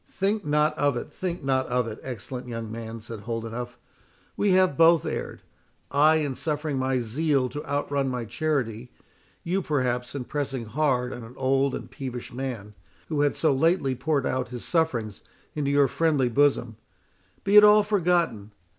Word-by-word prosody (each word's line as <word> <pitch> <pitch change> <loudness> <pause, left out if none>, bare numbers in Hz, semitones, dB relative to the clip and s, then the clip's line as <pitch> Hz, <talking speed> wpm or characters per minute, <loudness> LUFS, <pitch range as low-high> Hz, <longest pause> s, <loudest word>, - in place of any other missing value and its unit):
"Think 200 +2 -1
not 150 +1 +2
of 145 -3 +2
it—think 175 +6 -5
not 130 -1 +1
of 125 -1 0
it, 110 -2 -6
excellent 125 +1 -7
young 115 -2 -5
man," 115 0 -7
said 115 0 -8
Holdenough; 115 +2 -5 0.6
"we 205 - +1
have 185 -5 +4
both 165 +2 +5
erred—I 150 +3 -1
in 150 -3 0
suffering 150 0 -2
my 130 -1 0
zeal 135 +2 0
to 145 +3 -6
outrun 140 -1 -1
my 125 -2 -3
charity, 120 -2 -2 0.5
you 185 +3 0
perhaps 125 -5 -1
in 135 - -3
pressing 135 -3 -3
hard 125 +1 0
on 120 - -8
an 115 +3 -12
old 135 +1 +1
and - - -7
peevish 125 -2 -7
man, 120 -5 -5 0.4
who 150 -2 0
had 145 -1 +2
so 155 -3 +2
lately 140 -1 +2
poured 140 +1 0
out 130 0 -1
his 120 -1 -6
sufferings 125 - -1 0.3
into 145 -2 -1
your 140 -1 +4
friendly 145 -3 +1
bosom. 125 -4 +2 0.7
Be 200 +1 +2
it 210 - +10
all 210 0 +7
forgotten. 175 - 0
135 Hz, 165 wpm, -26 LUFS, 120-155 Hz, 0.7 s, it